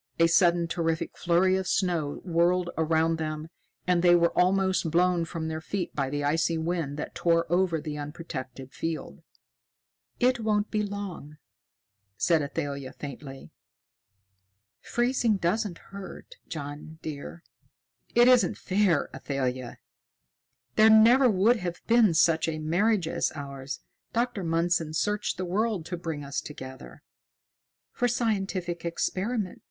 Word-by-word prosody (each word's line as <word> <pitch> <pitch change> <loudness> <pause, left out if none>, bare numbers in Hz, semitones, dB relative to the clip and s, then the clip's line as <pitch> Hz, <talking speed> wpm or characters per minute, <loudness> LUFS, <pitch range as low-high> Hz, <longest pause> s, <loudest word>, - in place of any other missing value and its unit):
A 165 - +5
sudden 170 0 +4
terrific 165 -1 -2
flurry 180 +2 +2
of 190 - -3
snow 170 -6 0
whirled 175 +1 +2
around 160 0 +1
them, 155 0 -4 0.4
and 180 -1 +2
they 175 0 +6
were 170 -1 +2
almost 190 -1 +2
blown 175 +1 +2
from 165 -1 -5
their 160 0 -4
feet 180 +1 -4
by 140 -2 -1
the 145 +1 -2
icy 165 +3 +1
wind 160 -3 -2
that 150 - -5
tore 165 -1 +2
over 175 -3 +2
the 150 -1 -5
unprotected 145 -4 -7
field. 165 -1 -5 1.0
"It 250 0 +3
won't 215 -1 0
be 215 - +1
long," 200 -7 -6 0.8
said 165 -3 +3
Athalia 140 -2 -4
faintly. 140 -1 -9 1.3
"Freezing 240 -3 +1
doesn't 190 +1 -1
hurt, 200 - -11
John, 150 +1 -7
dear." 155 +3 -7 0.7
"It 240 +1 +6
isn't 250 -1 +4
fair, 190 -5 +1
Athalia! 130 -3 -3 1.0
There 220 +1 +7
never 235 +4 +7
would 215 +4 +4
have 180 -3 -4
been 230 -7 +4
such 165 0 +3
a 160 -1 -2
marriage 175 +4 +1
as - - 0
ours. 140 -2 -6 0.3
Dr. 235 -4 -1
Mundson 165 -1 0
searched 210 +4 -1
the 185 - -3
world 200 -1 -1
to 175 - -4
bring 165 -4 -5
us 140 0 -3
together." 130 - -10 0.9
"For 245 - 0
scientific 195 -7 -1
experiment!" 190 +4 -2
170 Hz, 130 wpm, -27 LUFS, 155-195 Hz, 1.3 s, There